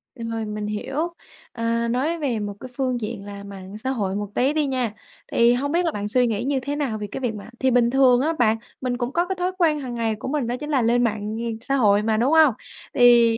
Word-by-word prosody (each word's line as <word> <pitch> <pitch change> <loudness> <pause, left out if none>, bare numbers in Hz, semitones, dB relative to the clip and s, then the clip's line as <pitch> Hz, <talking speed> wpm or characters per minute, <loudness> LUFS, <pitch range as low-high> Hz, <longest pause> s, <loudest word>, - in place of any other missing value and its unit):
Ừ, 235 - -8
rồi, 225 -1 -2
mình 210 0 -4
hiểu. 275 +11 -3 0.4
À, 230 0 -1
nói 290 +8 0
về 250 -7 -1
một 205 -1 -3
cái 255 - -8
phương 255 -3 0
diện 210 -2 -5
là 200 0 -8
mạng 200 0 -9
xã 260 +5 -4
hội 200 -7 -1
một 205 0 -3
tí 270 +4 +2
đi 310 -1 +1
nha. 255 -5 -1 0.4
Thì 235 +1 +5
hông 285 +4 -1
biết 350 +1 +2
là 330 - +1
bạn 205 -4 -3
suy 245 +2 +3
nghĩ 220 -1 -1
như 275 +1 0
thế 285 +3 -3
nào 275 -7 -1
về 210 -1 -5
cái - - -4
việc 240 -4 -1
mà 210 +1 -9
thì 260 0 +2
bình 240 -1 +4
thường 255 -1 +5
á 320 +4 +1
bạn 225 -2 +4 0.2
mình 250 -2 -1
cũng 245 +1 -2
có 345 +1 +2
cái 380 - -2
thói 360 +1 0
quen 315 -5 +3
hàng 250 -3 -5
ngày 225 -2 0
của 215 - -7
mình 270 -3 -1
đó 245 - -1
chính 300 0 -6
là 275 -4 +2
lên 240 +1 +3
mạng, 215 -3 0 0.2
ừm, 230 -1 -3
xã 275 - -1
hội 210 -5 +4
mà, 220 0 +1
đúng 245 +6 +2
hông? 315 -5 +6 0.4
Thì, 235 -2 +6
245 Hz, 270 wpm, -23 LUFS, 220-270 Hz, 0.4 s, hông